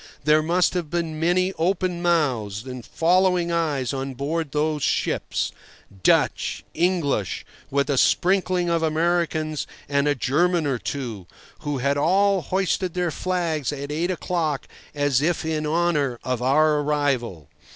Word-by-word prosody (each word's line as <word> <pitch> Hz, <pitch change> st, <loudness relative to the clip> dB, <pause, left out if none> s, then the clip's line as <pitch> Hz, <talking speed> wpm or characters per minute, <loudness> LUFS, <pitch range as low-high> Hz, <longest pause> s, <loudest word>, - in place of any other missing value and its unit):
There 155 Hz, +1 st, +4 dB
must 175 Hz, +3 st, +2 dB
have 175 Hz, -4 st, -2 dB
been 165 Hz, -2 st, -2 dB
many 180 Hz, +3 st, +2 dB
open 180 Hz, 0 st, 0 dB
mouths 125 Hz, -, 0 dB
and 125 Hz, -2 st, -7 dB
following 180 Hz, +2 st, +2 dB
eyes 150 Hz, -6 st, 0 dB
on 135 Hz, 0 st, -4 dB
board 150 Hz, +3 st, -2 dB
those 150 Hz, +1 st, 0 dB
ships—Dutch, 95 Hz, -7 st, -1 dB
English, 165 Hz, -, 0 dB, 0.2 s
with 140 Hz, 0 st, +1 dB
a 140 Hz, -3 st, +2 dB
sprinkling 185 Hz, -1 st, +2 dB
of 170 Hz, -1 st, +1 dB
Americans 160 Hz, -1 st, 0 dB, 0.2 s
and 140 Hz, 0 st, +1 dB
a 145 Hz, -, +2 dB
German 170 Hz, +6 st, +1 dB
or 135 Hz, -4 st, 0 dB
two—who 125 Hz, +3 st, -6 dB
had 140 Hz, +2 st, 0 dB
all 195 Hz, +5 st, +3 dB
hoisted 185 Hz, +1 st, -1 dB
their 180 Hz, -2 st, 0 dB
flags 165 Hz, -6 st, -1 dB
at 140 Hz, 0 st, -5 dB
eight 165 Hz, +4 st, -1 dB
o'clock 170 Hz, -5 st, -2 dB, 0.3 s
as 145 Hz, -2 st, +2 dB
if 170 Hz, +1 st, 0 dB
in 155 Hz, -1 st, -1 dB
honour 150 Hz, -6 st, +1 dB
of 125 Hz, -2 st, -2 dB
our 150 Hz, +4 st, +3 dB
arrival. 140 Hz, -, -1 dB
155 Hz, 135 wpm, -23 LUFS, 140-175 Hz, 0.3 s, There